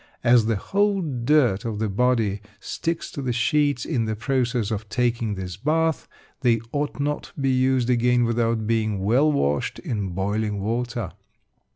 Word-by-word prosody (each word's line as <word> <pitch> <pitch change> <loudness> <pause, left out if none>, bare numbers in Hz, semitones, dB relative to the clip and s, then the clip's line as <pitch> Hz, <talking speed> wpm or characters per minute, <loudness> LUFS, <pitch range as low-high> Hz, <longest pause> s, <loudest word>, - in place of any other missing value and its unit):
As 120 -2 +5
the 115 - +2
whole 200 - +1
dirt 125 - +2
of 115 -3 -3
the 110 +1 0
body 105 -2 +1 0.2
sticks 165 +8 -3
to 140 - -5
the 130 -2 -1
sheets 140 +2 +1
in 125 -8 0
the 110 0 -2
process 120 -1 0
of 105 0 -4
taking 115 -2 0
this 90 -2 -6
bath, 160 +6 0 0.3
they 120 -3 +3
ought 145 -1 -2
not 145 +1 -1
to - - -9
be 135 -1 +2
used 130 -1 +2
again 125 0 +3
without 115 -1 0
being 110 -3 0
well 130 +9 +3
washed 75 - 0
in 105 -5 -3
boiling 105 +3 -1
water. 115 0 -2
120 Hz, 165 wpm, -24 LUFS, 110-130 Hz, 0.3 s, As